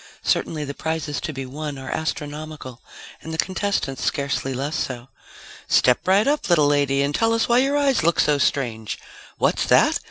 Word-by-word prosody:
Certainly 155 -2 0
the 140 - -5
prizes 160 -1 -3
to - - -3
be 135 -2 -6
won 145 +2 -6
are 135 0 -7
astronomical 150 -4 -5 0.4
and 160 - -8
the 160 - -4
contestants 185 -8 -1
scarcely 140 -1 -1
less 140 +4 -3
so. 125 0 -4 0.6
Step 125 +6 +3
right 195 +3 +4
up, 295 -6 0
little 160 -4 +5
lady 140 -1 +2
and 140 +1 -1
tell 225 +7 +2
us 230 - +1
why 240 +1 +4
your 275 +2 +2
eyes 280 -2 +2
look 170 +1 +2
so 150 -1 +3
strange! 115 -7 -1 0.4
What's - - +1
that? - - +4
150 Hz, 180 wpm, -22 LUFS, 135-170 Hz, 0.6 s, little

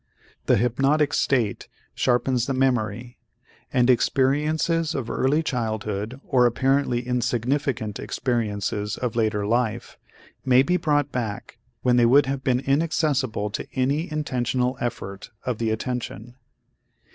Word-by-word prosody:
The - - +5
hypnotic 135 +5 +2
state 120 -7 0 0.3
sharpens 125 0 +1
the 135 - -1
memory 120 -2 -1 0.5
and 125 -2 +3
experiences 150 +6 +1
of 120 -4 -3
early 145 +5 +1
childhood 110 -2 -3
or 125 -2 +4
apparently 130 0 +1
insignificant 125 -2 -1
experiences 105 -4 -2
of 125 -3 -3
later 110 -3 0
life 115 +1 -1 0.4
may 130 0 +5
be 180 +5 +1
brought 145 -4 +1
back 115 -5 -5 0.2
when 125 -1 +3
they 120 -1 +5
would 140 +4 +5
have 135 0 -3
been 125 -1 +1
inaccessible 135 -7 0
to - - -5
any 140 +6 0
intentional 130 -3 -1
effort 105 -5 -5 0.2
of 125 -3 -2
the 115 -1 0
attention. 115 0 -4
125 Hz, 125 wpm, -24 LUFS, 115-135 Hz, 0.5 s, The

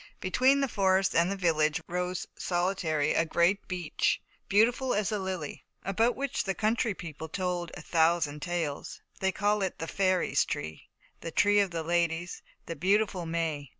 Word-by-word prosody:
Between 260 +9 +3
the 275 - +2
forest 195 -4 +2
and 170 +3 +3
the - - -1
village 155 -5 +2
rose 180 +1 -2
solitary 175 -4 0
a - - +3
great 170 +4 +1
beech, 180 -4 0 0.3
"beautiful 245 +5 +3
as 205 0 0
a 210 - -1
lily," 185 -6 -5 0.2
about 225 +6 +1
which 275 -1 -2
the 195 -1 -1
country 220 0 0
people 160 -2 -8
told 180 -1 -2
a - - -9
thousand 160 -3 +2
tales. 170 -5 -3 0.2
They 190 0 +1
called 205 +2 +1
it 190 -2 -2
the 165 - -4
"Fairies' 185 0 +2
Tree," 80 0 -6 0.3
the 165 - -5
"Tree 205 +5 +3
of 200 -2 +2
the 165 -2 -3
Ladies," 170 +1 -1 0.2
the 165 - -5
"Beautiful 190 +1 +1
May." 160 -4 -2
180 Hz, 165 wpm, -29 LUFS, 165-200 Hz, 0.3 s, Between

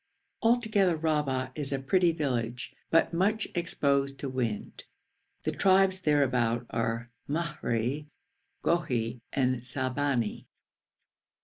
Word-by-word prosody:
Altogether 220 -7 +3
Rahba 150 -5 0
is 145 -1 -3
a 135 - +1
pretty 170 +6 +3
village, 125 -6 -2 0.2
but 165 +1 +3
much 200 +5 +1
exposed 140 -5 0
to 140 - -4
wind. 120 -5 -3 0.6
The - - 0
tribes 190 0 +4
thereabout 125 -7 +2
are 115 +1 -1 0.2
Mahri, 150 -3 -1 0.6
Gohi, 120 -8 0
and 130 -2 +1
Salbani. 130 -2 -1
140 Hz, 100 wpm, -29 LUFS, 125-170 Hz, 0.6 s, tribes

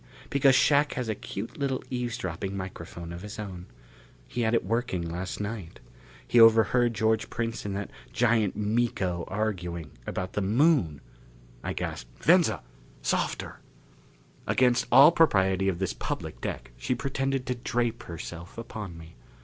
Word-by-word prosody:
Because 135 -1 +5
Shac 145 +2 +4
has 125 -3 -3
a - - +1
cute 110 - -7
little 135 -2 -1
eavesdropping 100 -7 -3
microphone 85 -2 -7
of 85 - -7
his 105 +1 -8
own. 95 -4 -7 0.6
He 120 - -3
had 115 0 +2
it 115 - +1
working 115 -4 -1
last 90 +3 -4
night. 105 -5 -5 0.5
He 120 - +4
overheard 115 +1 +6
George 110 0 +1
Prince 115 -1 -3
and 100 -1 -2
that 100 0 -4 0.2
giant 115 -4 +2
Miko 105 -5 0
arguing 90 -6 -3 0.2
about 95 0 -3
the 105 - 0
Moon!" 105 - +3 0.6
I - - -2
gasped, - - -6
"Venza! - - +4 0.4
Softer - - -1 0.4
" - - -29
Against 125 -1 +3
all 140 +5 +9
propriety 95 - +3
of 90 - -1
this 95 0 -1
public - - -5
deck - - -5
she 130 - -1
pretended 135 0 -1
to 125 - 0
drape 120 -1 -1
herself 85 +1 -8
upon 105 -6 -6
me. 80 -4 -13
105 Hz, 150 wpm, -28 LUFS, 90-120 Hz, 0.6 s, all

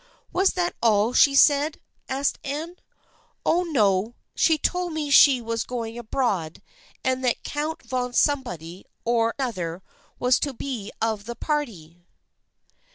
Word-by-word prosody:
" - - -38
Was 380 +1 +3
that 355 -1 -1
all 220 0 +3
she 275 +2 +5
said? 290 +2 +4 0.2
" - - -43
asked 270 +1 -1
Anne. 310 +5 -5 0.3
" - - -37
Oh, 345 - +3
no, 220 - +1 0.2
she 320 -2 +3
told 360 +2 -1
me 300 -2 -3
she 275 -2 +7
was 230 -1 -2
going 230 -2 -5
abroad 220 - -2 0.4
and 260 0 0
that 245 -2 0
Count 315 +3 -4
von 250 -1 -2
somebody 190 - -1 0.2
or 230 -1 +1
other 185 -9 -3 0.3
was 250 0 +3
to 280 - -2
be 230 -6 -5
of 220 -2 -1
the 235 +1 -6
party." 210 - -4
250 Hz, 150 wpm, -24 LUFS, 220-290 Hz, 0.4 s, she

